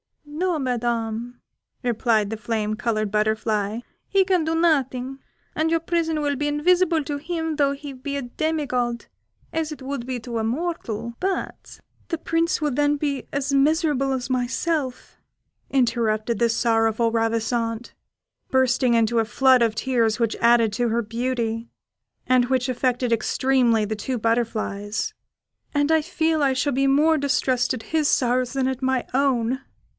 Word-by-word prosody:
"No, 325 +4 -1
Madam," 240 -2 -2 0.4
replied 225 -3 +1
the 225 - -3
flame 215 0 -2
coloured 215 -2 -1
butterfly, 215 0 0 0.3
"he 390 -1 +3
can 370 -3 +2
do 320 +1 -1
nothing, 270 -5 +1 0.4
and 315 +1 +1
your 330 0 +2
prison 330 -1 -1
would 285 -2 -1
be 295 - 0
invisible 330 +2 +2
to 290 0 -3
him 320 +1 -3
though 280 -2 +2
he 280 0 -8
be 280 +2 -5
a 280 - -3
demi 310 +5 -2
god, 240 -2 -2 0.5
as 320 -1 -1
it 295 -3 -8
would 265 -2 -4
be 255 -1 -3
to 235 0 -4
a - - -1
mortal; 235 -4 -3
but 385 0 -4
" - - -36
"The 330 - -1
Prince 330 +1 0
will 300 -2 0
then 290 +2 +2
be 280 -2 -2
as 280 0 -1
miserable 285 -1 +2
as 260 -1 -2
myself," 255 +2 -2 0.5
interrupted 235 -3 +1
the 235 -1 +3
sorrowful 225 0 +2
Ravissante, 230 +1 -1 0.6
bursting 255 -2 +3
into 230 0 +2
a 225 - +2
flood 260 +2 +4
of 225 -2 +2
tears, 230 -2 +1
which 230 -1 +1
added 230 -2 +4
to 240 +2 0
her 235 +1 0
beauty, 230 0 -2 0.6
and 255 -1 +3
which 255 -1 0
affected 250 -1 0
extremely 235 -1 +2
the 215 +1 -3
two 250 +4 -3
butterflies; 220 -2 -1 0.6
"and 290 +2 +2
I 320 -1 +4
feel 320 -1 0
I 275 -2 +3
shall 265 +2 0
be 275 +2 +2
more 305 +3 +4
distressed 260 -3 +1
at 225 - -8
his 310 -2 +3
sorrows 250 -1 +1
than 265 -1 0
at 260 0 -3
my 260 -1 0
own! 260 -2 +1
255 Hz, 160 wpm, -23 LUFS, 230-290 Hz, 0.6 s, flood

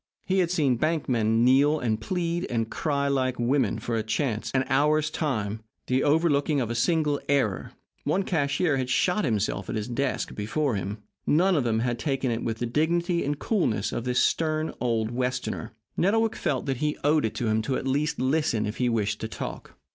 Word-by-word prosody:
He 190 0 +1
had 175 -2 +2
seen 145 -8 +2
bank 155 +4 0
men 115 -1 +2
kneel 140 +4 +5
and 110 -4 -1
plead 170 +4 -2
and 115 -2 -1
cry 140 -3 0
like 130 -2 0
women 120 -2 +1
for 115 +1 -3
a 110 - +1
chance 110 0 -1
an 130 0 +1
hour's 150 +3 +2
time 110 -9 -2 0.2
the 130 +1 +1
overlooking 150 -1 +2
of 120 -3 -1
a - - 0
single 150 +4 +1
error. 135 -9 0 0.3
One 195 - +1
cashier 145 -2 +1
had 130 -1 -2
shot 180 +9 +2
himself 110 -6 -1
at - - -2
his 105 -1 -2
desk 125 +2 -2
before 125 +7 -1
him. 100 +1 -4 0.2
None 180 +5 +4
of 145 - +2
them 110 -1 +1
had 120 -1 -1
taken 135 -2 -1
it 115 0 -2
with 115 -1 -2
the 120 - -2
dignity 170 +7 +1
and 145 +1 -1
coolness 145 - 0
of 120 - -3
this 125 0 +1
stern 155 -1 +1
old 115 -2 0
Westerner. 125 -2 -2 0.2
Nettlewick 220 +4 +2
felt - - -1
that 135 -3 -1
he 150 +3 -1
owed 150 +1 +3
it 110 - -3
to 120 - -2
him 110 0 +2
at 130 +3 -2
least 145 +4 0
to - - -2
listen 130 -6 +1
if 105 +2 -4
he 125 -1 +1
wished 110 -3 -1
to - - -2
talk. - - -7
135 Hz, 200 wpm, -26 LUFS, 115-155 Hz, 0.3 s, kneel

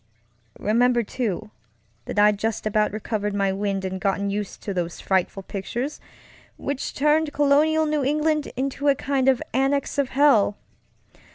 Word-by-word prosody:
Remember, 240 +3 +2
too, 215 -2 -3 0.5
that - - -6
I'd 205 0 +4
just 220 0 -2
about 215 0 +1
recovered 210 -1 -3
my 195 -1 +1
wind 195 0 -2
and 190 0 -4
gotten 200 0 0
used 205 -1 -5
to 200 - -3
those 175 -2 -3
frightful 190 0 0
pictures 235 +10 -4 0.6
which 280 -1 -4
turned 300 +1 +2
colonial 300 +2 +3
New 300 -2 0
England 300 +2 0
into 275 +2 -2
a 280 - +5
kind 270 -1 +1
of 260 -2 +2
annex 275 +2 0
of 275 -2 +1
hell. 260 -8 +4
235 Hz, 150 wpm, -24 LUFS, 200-280 Hz, 0.6 s, a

